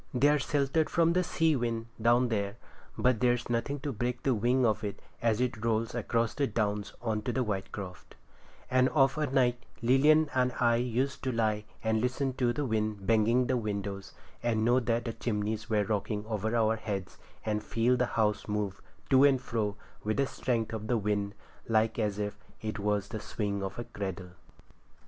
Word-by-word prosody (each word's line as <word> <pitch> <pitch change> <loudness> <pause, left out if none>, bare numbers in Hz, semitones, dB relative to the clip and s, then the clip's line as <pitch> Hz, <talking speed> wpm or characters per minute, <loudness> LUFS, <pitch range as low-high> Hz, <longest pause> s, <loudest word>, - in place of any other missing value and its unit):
They 140 +4 +5
are 150 0 +3
sheltered 145 +3 +1
from 170 0 +3
the 180 +1 +2
sea 165 -2 +2
wind 115 -2 -1 0.2
down 120 +2 +4
there, 100 -2 -1 0.4
but 125 -3 +2
there's 125 0 +1
nothing 140 +5 -1
to 145 - -2
break 120 +1 -3
the 135 - +3
wing 120 +3 +2
of 110 -1 +1
it 100 -1 -4 0.2
as 115 -1 +2
it 125 -3 -1
rolls 115 0 0
across 115 -1 0
the 140 -1 0
Downs 105 -2 -2
on 110 -2 0
to 125 - -2
Whitecroft; 100 -5 -4 0.6
and 130 0 +4
of 135 -3 +3
a 150 - +1
night 125 -2 +2 0.2
Lilian 150 +6 +5
and 125 -1 +2
I 120 -1 +4
used 125 +3 -1
to 130 - +1
lie 110 -2 0 0.2
and 110 -1 +1
listen 130 +2 0
to 125 -2 +2
the 145 +3 -2
wind 110 -4 -1
banging 115 +3 +3
the 130 0 +1
windows, 100 -3 -4 0.3
and 110 -2 +1
know 120 +2 +4
that 115 -1 0
the 115 - -2
chimneys 105 -1 -2
were 105 -2 +2
rocking 105 0 -2
over 110 +1 -2
our 115 -1 +3
heads, 100 -4 -5 0.3
and 105 -1 0
feel 120 +2 +2
the 125 0 +1
house 105 -2 +1
move 105 -2 -2 0.3
to 135 0 +7
and 140 -2 +5
fro 105 -4 -2 0.3
with 110 0 -1
the 140 - +3
strength 115 -4 -2
of 110 -1 -4
the 120 - +2
wind 105 -1 -1 0.3
like 110 0 +2
as 105 -2 0
if 105 -1 -3 0.2
it 110 -1 -4
was 100 -1 0
the 110 - -4
swing 100 -2 -3
of 95 -1 -4
a 120 - -3
cradle. 95 -4 -6
115 Hz, 190 wpm, -30 LUFS, 105-125 Hz, 0.6 s, to